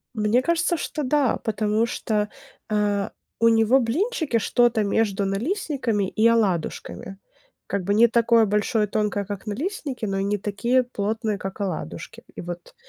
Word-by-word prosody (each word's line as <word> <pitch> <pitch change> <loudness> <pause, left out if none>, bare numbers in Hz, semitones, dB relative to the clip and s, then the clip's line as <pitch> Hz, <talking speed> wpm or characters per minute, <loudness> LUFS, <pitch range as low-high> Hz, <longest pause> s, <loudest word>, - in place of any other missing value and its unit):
Мне 215 +3 +2
кажется, 340 +3 +1
что 300 0 -4
да. 275 -1 +2
Потому 215 +1 +1
что, 210 -3 -1 0.4
а, 205 -1 0 0.3
у 230 - +5
него 225 +3 +4
блинчики 305 - 0
что-то 235 0 +2
между 200 -1 +1
налистниками 235 - -1
и 215 +4 +2
оладушками. 195 -3 -1 0.5
Как 200 -1 -2
бы 200 +3 0
не 230 +3 +6
такое 230 -1 +4
большое 210 +1 +1
и - - -23
тонкое, 205 -1 -1
как 205 +1 -7
налистники, 270 - -3
но 195 -1 -1
и - - 0
не 205 +1 0
такие 235 +6 +1
плотные, 220 -2 -2
как 195 +1 -6
оладушки. 175 - -5
И - - -6
вот, 175 0 -8
215 Hz, 155 wpm, -24 LUFS, 200-245 Hz, 0.5 s, не